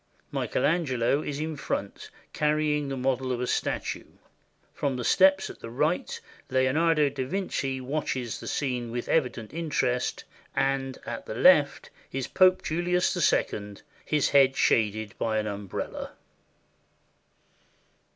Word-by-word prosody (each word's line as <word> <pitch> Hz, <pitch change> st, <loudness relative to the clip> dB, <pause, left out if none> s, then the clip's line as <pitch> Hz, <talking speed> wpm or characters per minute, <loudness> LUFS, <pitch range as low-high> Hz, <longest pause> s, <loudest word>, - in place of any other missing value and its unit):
Michael -, -, -1 dB
Angelo 140 Hz, -4 st, +1 dB
is 145 Hz, -2 st, -4 dB
in 155 Hz, 0 st, -3 dB
front, 100 Hz, -7 st, -4 dB, 0.2 s
carry 150 Hz, 0 st, +1 dB
ing 145 Hz, -2 st, -2 dB
the 135 Hz, -, -3 dB
model 130 Hz, 0 st, 0 dB
of 125 Hz, -, -1 dB
a 125 Hz, -, -1 dB
statue. -, -, -2 dB, 0.7 s
From 140 Hz, -2 st, -1 dB
the 125 Hz, -, -3 dB
steps 190 Hz, +4 st, +4 dB
at -, -, -10 dB
the 115 Hz, -, -8 dB
right 150 Hz, +8 st, -1 dB, 0.3 s
Leo 130 Hz, 0 st, +2 dB
nardo 160 Hz, 0 st, +3 dB
da 130 Hz, -, -3 dB
Vinci 135 Hz, -4 st, -2 dB
watches 130 Hz, -3 st, -3 dB
the -, -, -8 dB
scene 125 Hz, -4 st, -2 dB
with 120 Hz, +1 st, -4 dB
evident 125 Hz, -7 st, 0 dB
interest, 140 Hz, -7 st, -1 dB, 0.3 s
and 135 Hz, -1 st, 0 dB
at -, -, -6 dB
the -, -, -5 dB
left -, -, +4 dB, 0.2 s
is 135 Hz, -1 st, -3 dB
Pope 185 Hz, 0 st, +4 dB
Julius 180 Hz, +3 st, +1 dB, 0.2 s
II, 105 Hz, -1 st, -2 dB, 0.3 s
his 150 Hz, -2 st, +1 dB
head 135 Hz, -2 st, +5 dB
shaded 110 Hz, -1 st, +1 dB
by 110 Hz, -1 st, 0 dB
an 110 Hz, -, 0 dB
umbrella. 100 Hz, -2 st, -5 dB
135 Hz, 140 wpm, -27 LUFS, 125-155 Hz, 0.7 s, head